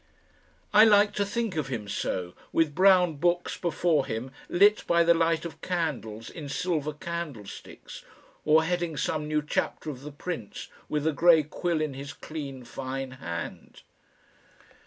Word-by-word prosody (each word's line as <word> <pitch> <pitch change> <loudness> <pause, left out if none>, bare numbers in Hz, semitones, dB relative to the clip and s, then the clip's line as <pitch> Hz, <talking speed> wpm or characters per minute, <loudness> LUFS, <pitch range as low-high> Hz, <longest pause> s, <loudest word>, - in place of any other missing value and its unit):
I 210 - +9
like 210 -1 +5
to 200 - 0
think 225 -1 -2
of 155 -4 -1
him 115 -6 -4
so, 90 -3 -3 0.2
with 160 -3 +2
brown 180 -2 +5
books 175 +3 +1
before 165 -4 +1
him 115 +4 -4 0.2
lit 205 +4 +5
by 170 0 +4
the 170 0 +6
light 165 0 +1
of 170 - -8
candles 140 - -3
in 150 -4 -8
silver 155 0 -1
candlesticks, 150 -8 -7 0.4
or 155 +1 +5
heading 170 -2 -1
some 150 +1 -1
new 150 0 0
chapter 150 +1 -2
of 130 -3 -10
"The 150 +1 -8
Prince," 145 - -6 0.2
with 150 0 -1
a 160 - +2
grey 165 0 +6
quill 165 +2 -2
in 155 -3 -2
his 140 +2 -7
clean 140 -5 -7
fine 130 +2 -5
hand. 85 -10 -7
155 Hz, 155 wpm, -27 LUFS, 135-175 Hz, 0.4 s, I